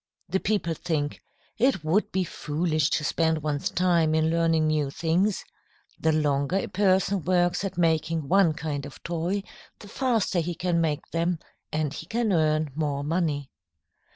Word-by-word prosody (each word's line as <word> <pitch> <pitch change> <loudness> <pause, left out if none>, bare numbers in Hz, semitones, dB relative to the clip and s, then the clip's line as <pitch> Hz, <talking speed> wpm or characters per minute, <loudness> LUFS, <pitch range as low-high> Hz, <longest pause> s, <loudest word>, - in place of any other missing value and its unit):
The 190 - +1
people 195 -6 0
think: 155 -3 -2 0.4
"It 250 - +2
would 170 +7 +1
be 190 0 +1
foolish 155 -1 -1
to 155 - 0
spend 160 0 +1
one's 145 -2 -1
time 170 -3 +2
in 160 0 +2
learning 165 -1 +2
new 155 -2 +1
things. 175 +7 0 0.6
The 160 - +2
longer 145 +1 +1
a 195 - 0
person 190 0 +2
works 175 +1 +1
at 190 -2 -4
making 160 -2 +1
one 185 -2 +4
kind 145 -2 -4
of 140 - -14
toy, 175 +4 -2 0.3
the 205 - -13
faster 225 -5 0
he 170 +1 -2
can 175 -1 0
make 155 -2 -1
them, 170 +1 0 0.3
and 150 -2 -1
he 160 - -8
can 225 -2 0
earn 155 -2 +2
more 145 -2 -2
money." 150 -3 -1
165 Hz, 160 wpm, -26 LUFS, 155-180 Hz, 0.6 s, one